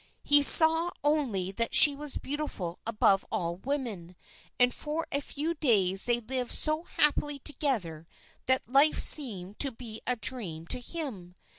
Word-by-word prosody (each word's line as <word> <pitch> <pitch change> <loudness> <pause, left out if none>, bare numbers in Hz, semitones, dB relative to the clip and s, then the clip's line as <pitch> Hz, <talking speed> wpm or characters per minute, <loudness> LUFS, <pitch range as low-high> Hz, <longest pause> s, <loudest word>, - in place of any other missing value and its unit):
He 290 0 +5
saw 325 +3 +6
only 255 -12 -2
that 230 +3 -1
she 290 - +9
was 295 0 -4
beautiful 265 - -6
above 205 -3 +1
all 170 0 -4
women, 215 -8 -6 0.4
and 245 0 +3
for 310 +2 -5
a 280 - -2
few 300 +4 -5
days 200 - +1
they 240 -1 +3
lived 250 +1 -5
so 310 +2 -1
happily 295 -2 -1
together 230 - -4 0.4
that 260 -3 +2
life 275 +5 +3
seemed 205 - +1
to 275 - -1
be 225 -2 -10
a 250 - +3
dream 205 -10 -3
to - - -1
him. 235 - -7
250 Hz, 150 wpm, -27 LUFS, 195-295 Hz, 0.4 s, she